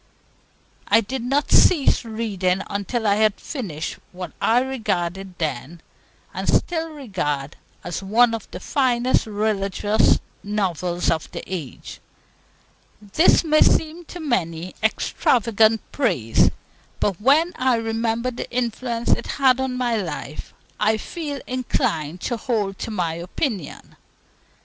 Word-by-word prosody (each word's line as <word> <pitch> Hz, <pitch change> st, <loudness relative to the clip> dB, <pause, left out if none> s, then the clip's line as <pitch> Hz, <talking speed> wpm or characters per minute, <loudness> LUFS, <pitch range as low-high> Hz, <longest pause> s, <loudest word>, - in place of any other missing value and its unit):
I 225 Hz, -, +5 dB
did 255 Hz, +4 st, -4 dB
not 275 Hz, +5 st, 0 dB
cease 305 Hz, -8 st, +5 dB
reading 200 Hz, -5 st, -1 dB
until 205 Hz, +3 st, -2 dB
I 205 Hz, -1 st, +3 dB
had 215 Hz, -1 st, +2 dB
finished 175 Hz, -, -5 dB
what 180 Hz, 0 st, -7 dB
I 235 Hz, +2 st, +4 dB
regarded 195 Hz, -8 st, -2 dB
then, 155 Hz, +1 st, -3 dB, 0.5 s
and -, -, -4 dB
still 325 Hz, -1 st, +1 dB
regard, 180 Hz, -, -3 dB, 0.3 s
as 175 Hz, +2 st, -4 dB
one 230 Hz, +4 st, +4 dB
of 225 Hz, -2 st, -5 dB
the 180 Hz, -, -7 dB
finest 250 Hz, +1 st, +1 dB
religious 205 Hz, 0 st, +2 dB, 0.3 s
novels 180 Hz, -4 st, -1 dB
of 160 Hz, -2 st, -2 dB
the -, -, -5 dB
age. 165 Hz, -9 st, -7 dB, 1.0 s
This 210 Hz, -, +4 dB
may 310 Hz, -1 st, +3 dB
seem 320 Hz, +2 st, +3 dB
to 350 Hz, -, -9 dB
many 180 Hz, -, -2 dB
extravagant 220 Hz, 0 st, +2 dB
praise; 130 Hz, -, +2 dB, 0.5 s
but 200 Hz, -2 st, 0 dB
when 310 Hz, +8 st, +4 dB
I 255 Hz, -1 st, +3 dB
remember 225 Hz, +2 st, -1 dB
the 245 Hz, -, -6 dB
influence 235 Hz, -1 st, -2 dB
it -, -, +1 dB
had 265 Hz, -2 st, +4 dB
on 260 Hz, -1 st, -1 dB
my 240 Hz, -2 st, +1 dB
life, 165 Hz, -6 st, -5 dB, 0.3 s
I 215 Hz, +1 st, +3 dB
feel 290 Hz, +2 st, -5 dB
inclined 175 Hz, -, -1 dB
to 240 Hz, -, -2 dB
hold 210 Hz, -6 st, -2 dB
to -, -, -4 dB
my 175 Hz, -7 st, -1 dB
opinion. 180 Hz, -, -4 dB
220 Hz, 125 wpm, -22 LUFS, 185-255 Hz, 1.0 s, I